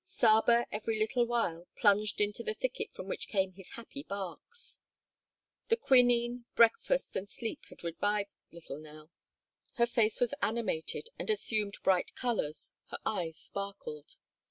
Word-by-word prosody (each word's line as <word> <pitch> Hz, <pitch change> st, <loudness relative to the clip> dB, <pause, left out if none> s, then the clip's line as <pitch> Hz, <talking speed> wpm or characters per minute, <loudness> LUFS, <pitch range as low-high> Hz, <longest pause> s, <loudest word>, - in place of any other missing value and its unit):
Saba 235 Hz, +1 st, +4 dB
every 220 Hz, +1 st, -1 dB
little 235 Hz, +3 st, +2 dB
while 180 Hz, -8 st, 0 dB
plunged 210 Hz, -1 st, +3 dB
into 205 Hz, 0 st, +1 dB
the 445 Hz, -1 st, -2 dB
thicket -, -, -2 dB
from -, -, -8 dB
which 475 Hz, -, -3 dB
came 190 Hz, -2 st, +1 dB
his 190 Hz, 0 st, -12 dB
happy 235 Hz, +4 st, -6 dB
barks. 200 Hz, -, -5 dB, 0.9 s
The 460 Hz, -1 st, +3 dB
quinine, 245 Hz, -, +4 dB
breakfast, 235 Hz, -, +4 dB
and 195 Hz, +1 st, -3 dB
sleep 225 Hz, -2 st, -4 dB
had -, -, -13 dB
revived 200 Hz, +4 st, 0 dB, 0.2 s
little 160 Hz, -4 st, -8 dB
Nell. 155 Hz, +1 st, -12 dB, 0.6 s
Her 235 Hz, -3 st, +4 dB
face 230 Hz, -3 st, +2 dB
was 245 Hz, +2 st, +2 dB
animated 220 Hz, -, -1 dB
and -, -, -2 dB
assumed 215 Hz, -, 0 dB
bright 185 Hz, -2 st, +2 dB
colors, 225 Hz, -12 st, -2 dB
her -, -, -5 dB
eyes 170 Hz, -6 st, -1 dB
sparkled. 200 Hz, -7 st, -6 dB
215 Hz, 140 wpm, -32 LUFS, 190-240 Hz, 0.9 s, Saba